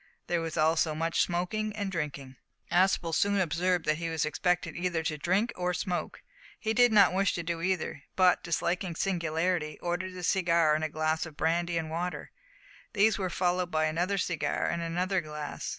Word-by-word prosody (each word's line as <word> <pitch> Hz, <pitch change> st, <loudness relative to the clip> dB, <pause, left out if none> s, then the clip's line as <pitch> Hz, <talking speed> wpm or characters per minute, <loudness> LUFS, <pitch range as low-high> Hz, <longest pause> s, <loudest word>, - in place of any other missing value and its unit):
There 175 Hz, -1 st, 0 dB
was 165 Hz, -1 st, -4 dB
also 160 Hz, 0 st, +2 dB
much 165 Hz, +1 st, 0 dB
smoking 210 Hz, +5 st, -1 dB
and 200 Hz, -2 st, -3 dB
drinking. 140 Hz, -6 st, -5 dB, 0.3 s
Aspel 175 Hz, -2 st, +2 dB
soon 200 Hz, +4 st, +2 dB
observed 180 Hz, 0 st, +1 dB
that 155 Hz, +1 st, +1 dB
he 165 Hz, 0 st, -2 dB
was 160 Hz, -3 st, 0 dB
expected 175 Hz, +4 st, 0 dB
either 175 Hz, -2 st, -1 dB
to 155 Hz, 0 st, -1 dB
drink 200 Hz, +9 st, +1 dB
or 180 Hz, 0 st, -1 dB
smoke. 175 Hz, -3 st, -3 dB, 0.4 s
He 220 Hz, -2 st, -1 dB
did 245 Hz, +1 st, +5 dB
not 200 Hz, -4 st, +6 dB
wish 195 Hz, +1 st, +1 dB
to 170 Hz, -, -3 dB
do 165 Hz, 0 st, -3 dB
either, 180 Hz, -5 st, -1 dB
but, 185 Hz, -1 st, +4 dB
disliking 175 Hz, +1 st, -1 dB
singularity, 165 Hz, -3 st, -1 dB
ordered 175 Hz, +2 st, -3 dB
a 180 Hz, -, -7 dB
cigar 170 Hz, -4 st, +3 dB
and 155 Hz, +1 st, 0 dB
a 155 Hz, -, -1 dB
glass 155 Hz, +1 st, -1 dB
of 155 Hz, -2 st, -13 dB
brandy 170 Hz, +1 st, 0 dB
and 160 Hz, -1 st, -3 dB
water. 175 Hz, +2 st, -4 dB, 0.6 s
These 215 Hz, 0 st, +3 dB
were 185 Hz, -2 st, -1 dB
followed 180 Hz, 0 st, 0 dB
by 155 Hz, -2 st, +1 dB
another 175 Hz, +5 st, 0 dB
cigar 170 Hz, -4 st, -1 dB
and 170 Hz, -, -1 dB
another 180 Hz, +3 st, 0 dB
glass. 150 Hz, -2 st, -6 dB
175 Hz, 180 wpm, -29 LUFS, 160-185 Hz, 0.6 s, not